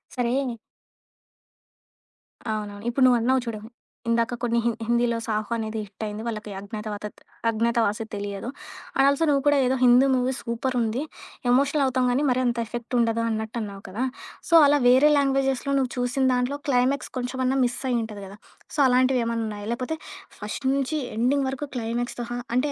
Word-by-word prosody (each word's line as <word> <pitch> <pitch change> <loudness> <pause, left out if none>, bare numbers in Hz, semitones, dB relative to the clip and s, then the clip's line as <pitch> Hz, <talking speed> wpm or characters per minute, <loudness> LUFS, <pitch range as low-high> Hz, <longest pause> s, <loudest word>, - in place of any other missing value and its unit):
సరే 245 0 0 2.2
అవునవును. 205 -1 -5
ఇప్పుడు 255 +3 +1
నువ్వన్నావు 250 +1 +3
చూడు, 220 -2 -4 0.5
ఇందాక 230 +1 +1
కొన్ని 235 -1 +1
హిన్ 235 -1 +1
హిందీలో 235 0 +2
'సాహో' 215 +1 -2
అనేది 220 0 -3
హిట్ 200 +2 -10
అయింది. 210 +1 -5
వాళ్ళకి 215 -2 -5
అజ్ఞాతవా 210 +1 -6 0.5
'అజ్ఞాతవాసి' 230 -1 +1
తెలియదు. 200 +3 -4 0.5
అండ్ 270 - +5
ఆల్సో 280 +3 +2
నువ్వు 280 -1 +3
కూడా 290 - +5
ఏదో 255 +1 +2
హిందీ 250 +2 +6
మూవీ 255 +1 +1
సూపరుంది, 235 0 -1 0.5
ఎమోషనల్ 280 +3 +3
అవుతాం 255 -1 +1
కానీ, 275 +4 +1
మరి 250 0 +2
అంత 240 0 0
ఎఫెక్ట్ 240 +2 -5
ఉండదు 230 0 +2
అన్నట్టు 220 +1 -3
అన్నావు 200 -2 -7
కదా! 210 +7 -3 0.5
సో, - - -1
అలా 290 +1 +4
వేరే 260 +4 +6
లాంగ్వేజెస్‌లో 270 0 +1
నువ్వు 255 -2 -1
చూసిన 245 +2 0
దాంట్లో 250 +3 0
క్లైమాక్స్ 260 +2 +1
కొంచెమన్నా 255 +1 -1
మిస్ 245 0 -2
అయ్యి 240 -2 +2
ఉంటది 210 -2 -7
గదా! 200 +2 -12 0.4
సో - - -3
అలాంటివి 255 0 +3
ఏమన్నా 230 -1 -1
ఉన్నాయా, 205 -1 -6
లేపోతే 255 +7 -3 0.4
ఫస్ట్ 210 +6 -6
నుంచి 275 +3 -1 0.2
ఎండింగ్ 265 +4 +2
వరకు 270 +2 -4
క్లైమాక్స్‌తో 240 +1 -3 0.3
అంటే, 285 +3 +1
240 Hz, 155 wpm, -25 LUFS, 225-260 Hz, 2.2 s, హిందీ